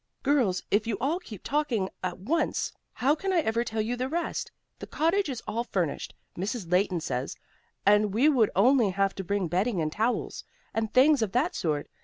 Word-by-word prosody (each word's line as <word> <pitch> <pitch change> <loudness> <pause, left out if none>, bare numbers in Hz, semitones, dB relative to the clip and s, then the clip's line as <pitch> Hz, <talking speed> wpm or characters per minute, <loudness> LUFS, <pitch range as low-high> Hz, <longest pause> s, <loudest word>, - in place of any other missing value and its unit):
"Girls, 255 -10 +2
if 210 +2 +2
you 215 -4 -1
all 295 +8 0
keep 220 - -11
talking 275 -10 0 0.2
at 180 -1 -2
once, 300 - -1 0.2
how 275 +3 +2
can 385 +5 -2
I 355 -3 +3
ever 230 -3 0
tell 220 -2 -2
you 230 +3 -1
the 255 +2 -2
rest? 340 +3 -3 0.3
The - - -7
cottage 335 +3 +1
is 250 -4 -5
all 230 +2 -1
furnished, 180 -10 -2 0.2
Mrs. 195 -1 -4
Leighton 180 -2 +2
says, 130 -4 -3 0.5
and 210 0 +4
we 235 +9 +3
would 250 -8 +4
only 235 +2 +4
have 195 +1 +1
to 195 - -5
bring 200 0 -1
bedding 185 +4 0
and 155 -1 -1
towels, 225 +7 -1 0.3
and 220 -1 -1
things 275 +1 +5
of 215 -4 -1
that 300 +9 +1
sort. 150 - -1
220 Hz, 195 wpm, -28 LUFS, 195-275 Hz, 0.5 s, things